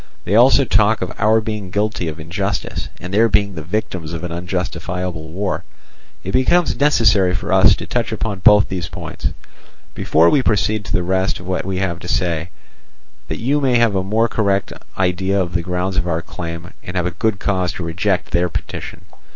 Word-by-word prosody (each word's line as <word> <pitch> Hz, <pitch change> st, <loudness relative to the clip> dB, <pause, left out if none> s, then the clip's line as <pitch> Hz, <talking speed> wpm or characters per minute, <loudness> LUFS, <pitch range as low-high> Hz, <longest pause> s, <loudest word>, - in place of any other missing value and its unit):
They 95 Hz, -, -2 dB
also 130 Hz, +3 st, +6 dB
talk 110 Hz, -1 st, +3 dB
of 90 Hz, -, -5 dB
our 110 Hz, +2 st, +4 dB
being 105 Hz, -3 st, -4 dB
guilty 105 Hz, -2 st, -1 dB
of 80 Hz, 0 st, -5 dB
injustice, 90 Hz, +5 st, -3 dB
and 90 Hz, +2 st, -7 dB
their 115 Hz, +3 st, +4 dB
being 100 Hz, -1 st, +2 dB
the 80 Hz, -, -6 dB
victims 85 Hz, -2 st, -3 dB
of 85 Hz, -, -5 dB
an 85 Hz, -, -4 dB
unjustifiable 90 Hz, -1 st, -4 dB
war. 95 Hz, +4 st, -2 dB, 0.6 s
It -, -, -4 dB
becomes 165 Hz, +7 st, +3 dB
necessary 110 Hz, -10 st, +4 dB
for -, -, -2 dB
us -, -, +6 dB
to -, -, -7 dB
touch -, -, -1 dB
upon 105 Hz, -4 st, -3 dB
both 105 Hz, +2 st, +6 dB
these 90 Hz, -4 st, -4 dB
points -, -, -4 dB, 0.7 s
before 80 Hz, +2 st, +3 dB
we 140 Hz, -, +4 dB
proceed 105 Hz, -2 st, +1 dB
to 95 Hz, -, -8 dB
the 90 Hz, -, +1 dB
rest 95 Hz, +1 st, 0 dB
of 90 Hz, -, -11 dB
what 90 Hz, 0 st, -2 dB
we 95 Hz, -1 st, -2 dB
have 90 Hz, -3 st, -1 dB
to 85 Hz, -, -9 dB
say, 85 Hz, -3 st, -1 dB, 0.8 s
that -, -, -4 dB
you 140 Hz, +5 st, 0 dB
may 130 Hz, -3 st, +2 dB
have 115 Hz, -3 st, +3 dB
a 95 Hz, -, +2 dB
more 110 Hz, +5 st, +1 dB
correct 100 Hz, -3 st, 0 dB, 0.2 s
idea 95 Hz, +1 st, +1 dB
of 90 Hz, -2 st, -2 dB
the 85 Hz, -, +1 dB
grounds 90 Hz, +2 st, -2 dB
of 90 Hz, -1 st, 0 dB
our 85 Hz, -1 st, -1 dB
claim, 85 Hz, 0 st, -7 dB
and 90 Hz, +1 st, -5 dB
have 90 Hz, 0 st, -2 dB
good 110 Hz, -3 st, +1 dB
cause 95 Hz, -3 st, 0 dB
to 90 Hz, -, -6 dB
reject 90 Hz, +3 st, -1 dB
their 90 Hz, +1 st, +1 dB
petition. -, -, -6 dB
95 Hz, 195 wpm, -19 LUFS, 90-105 Hz, 0.8 s, also